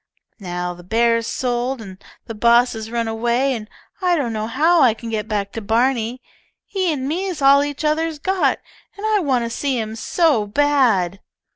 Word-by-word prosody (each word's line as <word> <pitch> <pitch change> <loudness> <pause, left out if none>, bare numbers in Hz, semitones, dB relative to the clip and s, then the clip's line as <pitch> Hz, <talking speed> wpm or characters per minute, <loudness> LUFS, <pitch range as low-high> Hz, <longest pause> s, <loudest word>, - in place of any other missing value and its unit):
Now 180 -2 -4
the 175 - -13
bear's 230 +3 +1
sold 250 +1 -2
and 195 -3 -11 0.2
the 225 - -6
boss 235 +3 +4
has 220 -1 -6
run 230 -1 -2
away, 240 +4 0
and 215 -3 -6 0.3
I 360 -1 +3
don't 260 -8 -1
know 215 0 -3
how 320 +8 +3
I 240 -5 +5
can 230 0 -8
get 215 -1 -2
back 205 -2 -2
to 225 - -6
Barney. 235 +2 0 0.4
Him 355 -8 -1
an 260 - -3
me's 355 +2 -2
all 280 0 +5
each 290 +1 -4
other's 315 +1 0
got, 380 +5 +1 0.4
and 410 - -5
I 430 -1 +2
want 260 -8 0
to - - -3
see 270 +1 -1
him 220 0 -4
so 275 -4 +1
bad." 230 -8 +2
240 Hz, 185 wpm, -20 LUFS, 220-290 Hz, 0.4 s, I